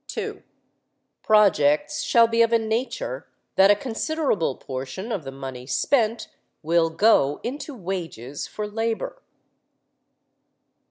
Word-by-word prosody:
(2) - - -5 0.8
Projects 210 - +3
shall 235 -1 +5
be 230 0 +2
of 230 0 +4
a 230 - +5
nature 255 - -3 0.3
that 190 +1 +6
a 205 - +7
considerable 235 - -1
proportion 135 - -6
of 195 -8 -2
the 135 - -7
money 130 -2 -8
spent 230 - +1 0.4
will 165 +1 +2
go 160 -5 +3
into 285 +3 -5
wages 170 - -5
for 210 0 -5
labor. 225 +2 -3
210 Hz, 115 wpm, -24 LUFS, 150-230 Hz, 0.8 s, a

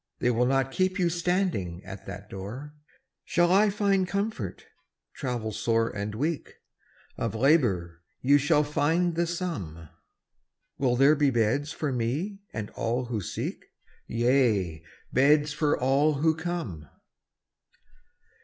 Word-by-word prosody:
They 125 - +1
will 120 +1 +2
not 135 0 +1
keep 185 +5 0
you 180 -3 +2
standing 170 - -1
at 95 0 -9
that 100 +1 -8
door. 115 +11 -7 0.5
Shall 175 0 +2
I 205 +3 +5
find 195 -2 +1
comfort, 200 - -3 0.5
travel 120 -5 -3
sore 115 +1 0
and 105 +1 -3
weak? 150 +6 -2 0.6
Of 115 -1 -2
labor 110 - +2 0.2
you 140 +3 +4
shall 145 +1 +3
find 160 +4 +1
the 170 +1 0
sum. 100 - -5 0.9
Will 125 -3 +2
there 135 +4 +6
be 145 -2 +3
beds 130 +5 +1
for 150 -2 -2
me 140 - -2
and 105 -2 -5
all 120 +3 -1
who 115 -3 -3
seek? - - -4 0.4
Yea, 115 - +1 0.3
beds 145 +3 +4
for 150 -1 +1
all 140 +4 +3
who 160 +3 +2
come. 160 - -5
135 Hz, 130 wpm, -27 LUFS, 110-165 Hz, 0.9 s, there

